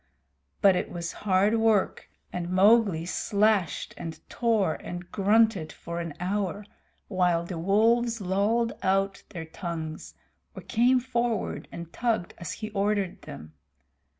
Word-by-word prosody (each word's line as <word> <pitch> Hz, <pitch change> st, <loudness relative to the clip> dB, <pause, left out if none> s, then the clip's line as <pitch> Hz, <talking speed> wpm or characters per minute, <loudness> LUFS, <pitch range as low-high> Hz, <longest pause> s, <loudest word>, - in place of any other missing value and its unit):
But 195 Hz, -2 st, +6 dB
it -, -, -2 dB
was 170 Hz, -1 st, -4 dB
hard 205 Hz, +2 st, +2 dB
work, 220 Hz, -3 st, +1 dB, 0.2 s
and 175 Hz, -1 st, -3 dB
Mowgli 195 Hz, -2 st, +4 dB
slashed 200 Hz, 0 st, +1 dB
and 165 Hz, -1 st, -6 dB
tore 220 Hz, -8 st, +1 dB
and 175 Hz, 0 st, -8 dB
grunted 205 Hz, -4 st, +3 dB
for 170 Hz, +1 st, -6 dB
an 165 Hz, -3 st, -5 dB
hour, 200 Hz, +2 st, -2 dB, 0.4 s
while 180 Hz, -3 st, +1 dB
the 170 Hz, -1 st, -5 dB
wolves 230 Hz, +5 st, +2 dB
lolled 205 Hz, +5 st, +1 dB
out 195 Hz, +1 st, +1 dB
their 165 Hz, -3 st, -6 dB
tongues, 160 Hz, -2 st, -6 dB, 0.4 s
or -, -, -8 dB
came 245 Hz, +2 st, +3 dB
forward 240 Hz, -4 st, -2 dB
and 170 Hz, -1 st, -8 dB
tugged 225 Hz, -7 st, -1 dB
as 170 Hz, -, -5 dB
he 215 Hz, 0 st, -6 dB
ordered 200 Hz, -2 st, -1 dB
them. 75 Hz, +2 st, -10 dB
195 Hz, 130 wpm, -27 LUFS, 175-220 Hz, 0.4 s, But